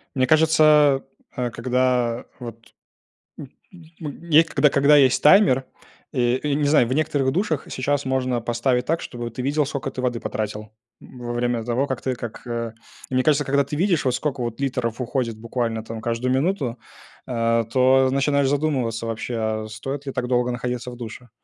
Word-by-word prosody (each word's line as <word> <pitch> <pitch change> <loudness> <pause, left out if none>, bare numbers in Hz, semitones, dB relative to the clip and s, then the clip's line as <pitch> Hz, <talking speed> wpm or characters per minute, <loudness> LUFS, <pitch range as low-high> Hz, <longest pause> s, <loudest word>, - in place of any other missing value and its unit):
Мне 130 -1 +2
кажется, 155 -2 +4 0.3
а 125 -1 -3
когда 125 0 0 0.2
вот 115 -1 -10 0.7
м 140 - -8 0.5
м 150 -3 -4
мне, 165 -1 +5
когда 155 -2 +2
когда 140 +2 +4
есть 135 -3 +4
таймер, 150 -6 +5 0.5
э, 125 -1 +2
не 145 0 +1
знаю, 145 -5 +4
в 130 - -1
некоторых 145 -3 +1
душах 165 -2 -1
сейчас 140 +2 -1
можно 130 -2 0
поставить 125 +2 0
так, 165 +4 0
чтобы 120 -1 -6
ты 120 - -6
видел, 145 +3 +1
скока 140 -1 -4
ты 130 - -8
воды 125 -2 -1
потратил 105 -1 -5 0.3
во 120 -1 -8
время 120 -1 -1
того, 125 +4 0
как 130 - -3
ты 130 - -1
как, 120 -2 -8
э 115 -1 -3 0.4
Мне 130 0 +1
кажется, 145 -1 +2
когда 140 +1 +2
ты 140 - -6
видишь, 175 -1 +1
вот 130 - +2
скока 140 -1 -3
вот 120 0 -4
литров 125 -3 -2
уходит 120 -3 -2
буквально 115 -1 -3
там 115 0 -7
каждую 120 +2 -1
минуту, 135 -4 0 0.5
а 115 -1 +1
то 130 +3 +3
начинаешь 140 0 +2
задумываться 130 -6 -1
вообще, 115 +2 -4
а 110 -1 -2
стоит 135 +6 -6
ли 135 - -3
так 125 -1 -2
долго 125 0 +1
находиться 125 0 -4
в 120 - -10
душе? 120 +1 -9
130 Hz, 175 wpm, -23 LUFS, 120-140 Hz, 0.7 s, мне